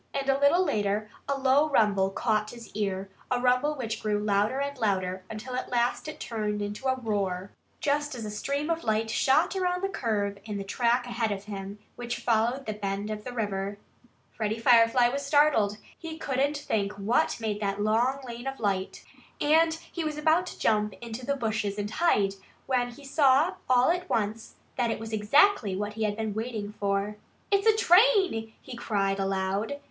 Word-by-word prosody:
And 275 -1 -2
a 270 0 +3
little 320 +6 +4
later 210 - -1 0.2
a 280 - +1
low 275 +3 +3
rumble 200 -7 +3
caught 215 +1 0
his 235 -1 -11
ear 195 -2 -2 0.2
a 250 - +1
rumble 250 +4 +2
which 230 -5 -4
grew 210 -1 0
louder 210 +4 +1
and 280 0 -2
louder 185 -4 -1
until 220 +4 -7
at 255 - -3
last 240 +4 0
it 310 - -7
turned 210 -2 -3
into 205 +6 -4
a 260 - +2
roar, 200 -4 -2 0.3
just 290 -1 0
as 230 -3 -6
a 210 - -5
stream 280 +9 -2
of 330 0 -2
light 220 0 0
shot 265 +10 +2
around 360 -1 0
the 390 - +1
curve 205 - -2
in 210 -2 -5
the 200 - -4
track 240 +4 +1
ahead 235 -2 -1
of 200 -1 -4
him, 200 -1 -7 0.2
which 240 0 -4
followed 235 +3 +1
the 215 - -3
bend 200 0 -3
of 210 0 -5
the 250 - -6
river. 200 -3 -3 0.5
Freddie 215 0 -2
Firefly 235 +1 +5
was 280 +3 -3
startled. 280 -8 +3 0.2
He 320 -1 -8
couldn't 285 -1 0
think 205 -7 -1
what 220 +10 0
made 215 -2 -2
that 200 0 -1
long 240 +6 +1
lane 240 0 -7
of 270 0 -4
light. 195 -3 -2 0.4
And 320 +2 +4 0.2
he 340 - -3
was 305 -1 -3
about 320 +4 +2
to - - -8
jump 210 -2 +1
into 240 +1 -7
the 280 - +1
bushes 215 -5 -2
and 205 0 -3
hide 210 - +2 0.3
when 245 -2 +1
he 280 +4 -13
saw 275 +3 +4 0.2
all 255 +4 +5
at 360 +1 -3
once 220 +1 -2 0.2
that 245 -2 +1
it - - -2
was 225 0 -7
exactly 220 - +3
what 205 +2 -3
he 220 0 -1
had 205 0 -2
been 220 -2 -2
waiting 220 -2 -4
for. 200 +1 -1 0.3
"It's 400 +2 +3
a 435 -1 +5
train!" 375 - +4
he 255 - -9
cried 200 -4 -1
aloud. 195 +6 -1
225 Hz, 190 wpm, -28 LUFS, 205-275 Hz, 0.5 s, Firefly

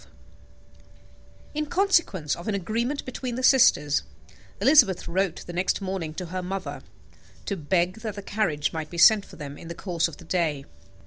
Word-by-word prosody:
In 305 0 -2
consequence 335 - +1
of 170 - -10
an 210 - 0
agreement 230 +9 -2
between 255 -1 -5
the 255 - -4
sisters, 150 - +5 0.6
Elizabeth 255 - +5
wrote 190 0 -1
the 175 - -8
next 180 +2 0
morning 185 -5 -4
to 180 - -4
her 185 - -2
mother, 190 +1 -5 0.6
to 200 - -2
beg 175 +4 0
that 215 -2 -5
the 205 - -7
carriage 175 -9 -1
might 160 -1 -4
be 170 - -8
sent 205 +4 +7
for - - -13
them 145 -2 -8
in - - -10
the 170 - -6
course 175 -3 -1
of 165 - -11
the - - -14
day. 155 -6 -1
185 Hz, 175 wpm, -25 LUFS, 165-220 Hz, 0.6 s, sent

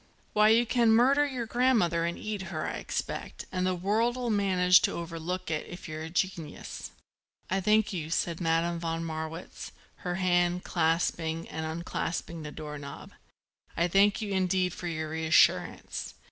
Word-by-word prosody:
Why 210 0 +5
you 230 +2 +5
can 235 -1 +3
murder 270 +6 +5
your 255 -4 -3
grandmother 225 -9 +2
and 170 0 -2
eat 205 -4 -4
her, 155 -4 -3
I - - -3
expect, - - -4
and 185 0 0
the 185 - +1
world'll 230 +6 0
manage 185 -3 +5
to - - +1
overlook 170 +1 -4
it, 155 - -2
if 175 +1 -9
you're 155 0 -5
a 160 - -5
genius." 170 -3 -3 0.6
"I 190 +1 +1
thank 210 +1 +3
you," 160 -4 -4
said 170 +1 -1
Madame 165 +1 +1
von 165 0 -2
Marwitz, 160 +1 -6 0.3
her 180 -1 -3
hand 175 -1 +2
clasping 165 -1 0
and 160 0 -4
unclasping 170 0 -4
the 150 -1 -6
door 150 -1 -7
knob. 140 0 -9 0.7
"I 170 - +3
thank 200 +4 +3
you 205 - -4
indeed 185 -1 +1
for 180 -2 -6
your 160 -2 -3
reassurance. 160 0 +2
175 Hz, 160 wpm, -29 LUFS, 165-200 Hz, 0.7 s, Why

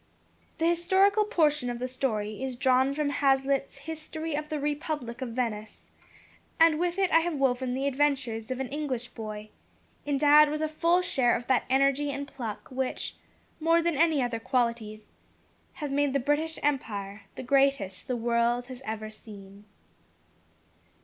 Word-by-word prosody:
The 325 - 0
historical 380 +5 +3
portion 300 - +2
of 240 - -3
the 250 +1 -3
story 220 -4 -2
is 265 -1 -3
drawn 260 +2 +3
from 285 0 -1
Hazlitt's 275 0 +1
History 320 0 -5
of 300 +1 -3
the 305 - -2
Republic 290 -4 -3
of 260 - -3
Venice, 225 -3 -4 0.7
and 325 -1 +5
with 350 +1 -1
it 385 -2 +1
I 330 - +6
have 335 -1 -2
woven 260 -2 0
the 270 +1 -2
adventures 270 -5 0
of 255 0 -3
an 265 -2 -3
English 270 -5 -3
boy, 215 -2 -7 0.6
endowed 295 +1 +6
with 305 +1 -2
a - - +1
full 335 +3 +2
share 260 -9 +2
of 240 - -4
that 260 -1 +2
energy 275 +2 +2
and 280 0 -4
pluck 240 -6 -6
which, 260 0 -3 0.4
more 330 +1 +3
than 335 -1 0
any 315 -2 +3
other 240 -2 -2
qualities, 230 -3 -2 0.6
have 295 -3 -5
made 285 -1 +1
the 280 - +2
British 295 +4 0
empire 205 -8 -2
the - - -6
greatest 270 -8 +1
the 250 - -1
world 235 +1 +1
has 255 0 -9
ever 215 -1 -5
seen. 200 -2 -13
270 Hz, 160 wpm, -28 LUFS, 240-300 Hz, 0.7 s, I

